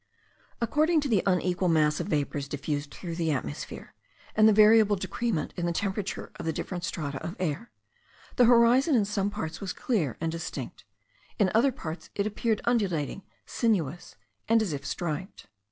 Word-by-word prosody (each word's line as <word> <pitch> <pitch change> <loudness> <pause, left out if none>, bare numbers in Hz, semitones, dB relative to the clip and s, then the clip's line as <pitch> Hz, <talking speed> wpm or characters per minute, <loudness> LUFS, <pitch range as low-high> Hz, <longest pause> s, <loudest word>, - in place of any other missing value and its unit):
According 305 +8 +2
to 285 - -2
the 215 -8 +3
unequal 180 0 +1
mass 155 -3 +3
of - - -3
vapours 145 -1 -1
diffused 145 +1 -3
through 170 +3 -7
the 165 -1 -1
atmosphere, 125 - -4 0.4
and 215 0 +6
the - - +6
variable 215 0 +6
decrement 190 -2 -2
in 175 -1 -2
the - - +1
temperature 195 +3 -3
of - - -6
the - - +2
different 175 +2 -5
strata 145 -5 -4
of 170 - -5
air, 185 +7 -2 0.7
the 245 - +6
horizon 245 +5 +5
in 215 -4 +3
some 200 -1 -1
parts 160 -5 -5
was 190 -2 -3
clear 175 - -1
and 165 0 -1
distinct; 165 +1 -6 0.5
in 195 -5 +3
other 240 +5 +4
parts 165 -9 -7
it 200 - 0
appeared 215 +1 -1
undulating, 195 - 0 0.2
sinuous, 180 - -1 0.3
and 225 -1 +5
as 185 -8 -2
if 140 -1 -5
striped. 175 +5 -4
190 Hz, 170 wpm, -28 LUFS, 160-220 Hz, 0.7 s, and